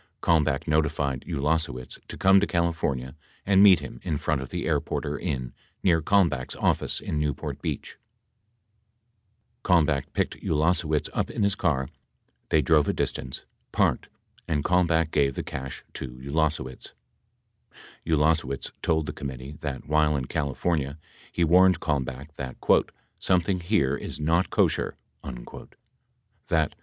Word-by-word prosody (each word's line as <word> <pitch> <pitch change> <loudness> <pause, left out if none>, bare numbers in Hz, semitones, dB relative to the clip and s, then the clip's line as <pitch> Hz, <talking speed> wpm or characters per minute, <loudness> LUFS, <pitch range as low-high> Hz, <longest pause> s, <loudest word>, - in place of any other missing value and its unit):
Kalmbach 80 -4 +2
notified 75 -4 +1
Ulasewicz 75 -5 -2
to - - -7
come 95 +1 +6
to 105 - +1
Cali 85 -1 +1
fornia 65 -5 -2 0.3
and 95 -1 +5
meet 95 -6 +8
him 65 -4 -8
in 80 -5 -2
front 75 -2 -1
of 65 - -7
the - - -3
Airporter - - -1
Inn 65 -3 -3 0.3
near 85 -3 +4
Kalmbach's 80 -8 +2
office - - 0
in 75 - -2
Newport 75 -2 -3
Beach. - - -4 1.7
Kalmbach 80 -6 +3
picked - - -1
Ulasewicz 80 -1 +1
up - - -1
in - - -2
his 100 0 +3
car, 75 -8 0 0.6
they 75 - +3
drove 75 +1 +4
a - - +1
distance, 65 0 -3 0.3
parked, - - +1 0.4
and 75 -4 0
Kalmbach 85 -3 +2
gave 70 -2 +2
the - - -3
cash 65 -1 -6
to 65 - -5
Ulase 75 +3 0
wicz. 65 -1 -10 1.1
93 80 - -1
Ulasewicz 75 -3 +1
told 80 -1 +1
the - - -5
committee 70 +1 -7
that, 70 -3 -4
while 75 -1 +2
in 65 - -3
California, 70 +1 -1 0.3
he 85 - 0
warned 90 +1 +5
Kalmbach 70 -2 -2
that 65 -2 -5 0.6
"something 90 0 +1
here 85 -7 +1
is - - -6
not 80 +4 +2
Kosher," - - +1 1.5
that - - +2
75 Hz, 140 wpm, -26 LUFS, 70-85 Hz, 1.7 s, meet